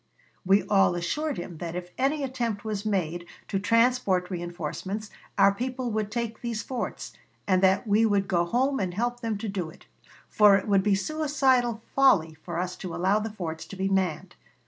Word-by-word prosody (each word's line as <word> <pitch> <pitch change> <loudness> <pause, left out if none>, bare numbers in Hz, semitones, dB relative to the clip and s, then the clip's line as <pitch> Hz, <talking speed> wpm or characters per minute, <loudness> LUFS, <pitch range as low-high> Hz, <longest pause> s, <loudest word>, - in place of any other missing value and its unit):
"We 195 +2 +4
all 195 -3 +3
assured 290 - -2
him 175 -1 -6
that 170 -1 -5
if 180 0 -6
an 270 +2 +2
attempt 250 -8 -3
was 215 -1 -3
made 175 -4 -1 0.2
to 195 - -1
transport 230 -4 +2
reënforcements, 180 +4 -5 0.3
our 200 - +6
people 250 +2 -3
would 215 -1 -1
take 230 0 -4
these 230 -3 -3
forts, 255 +1 -5 0.3
and 185 -2 +2
that 190 +3 +3
we 220 +1 +3
would 200 -2 +1
go 175 -2 +2
home 265 +8 +1
and 180 -2 -2
help 240 +3 -1
them 225 -3 -2
to 220 +2 -5
do 190 -5 -3
it; 160 - -16 0.4
for 210 -2 +6
it 195 - -1
would 200 -2 +4
be 200 0 +2
suicidal 260 -2 +1
folly 185 -13 +4
for 170 -2 -5
us 180 +1 -2
to 180 -3 -6
allow 190 +4 +2
the 220 +1 -3
forts 165 -6 -5
to - - -9
be 190 +1 -1
manned. 185 -2 -1
205 Hz, 190 wpm, -27 LUFS, 180-235 Hz, 0.4 s, our